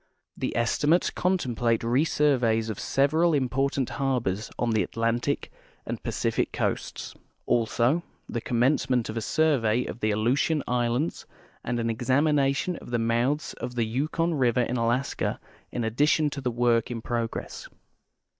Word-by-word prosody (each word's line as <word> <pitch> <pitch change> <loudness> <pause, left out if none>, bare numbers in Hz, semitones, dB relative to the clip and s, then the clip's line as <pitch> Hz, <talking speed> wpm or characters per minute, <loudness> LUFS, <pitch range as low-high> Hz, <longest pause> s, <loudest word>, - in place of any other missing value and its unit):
The - - -3
estimates 145 +8 +2
contemplate 120 - 0
resurveys 120 -3 +2
of 105 - -7
several 155 +4 +2
important 135 0 0
harbors 120 -7 -1
on 120 -1 0
the 110 -1 +2
Atlantic 115 +8 -1 0.3
and - - -4
Pacific - - -1
coasts; - - -3 0.3
also 120 +6 +2 0.3
the 115 - -3
commencement 125 0 +1
of 110 - -4
a - - -1
survey 125 -5 +2
of - - -6
the 110 - 0
Aleutian 125 +8 +1
islands 125 +5 -1 0.4
and 120 0 -2
an 115 0 0
examination 140 +6 +1
of - - -11
the 120 - 0
mouths 120 +6 0
of 125 +1 -5
the 115 -2 +1
Yukon 155 +8 -1
river 125 -4 +2
in 120 +1 -1
Alaska 120 +3 0 0.3
in 120 - -2
addition 145 +6 +2
to 140 - -5
the 130 - 0
work 120 -1 +2
in 115 -2 -5
progress. 115 -1 -4
125 Hz, 140 wpm, -26 LUFS, 115-140 Hz, 0.4 s, estimates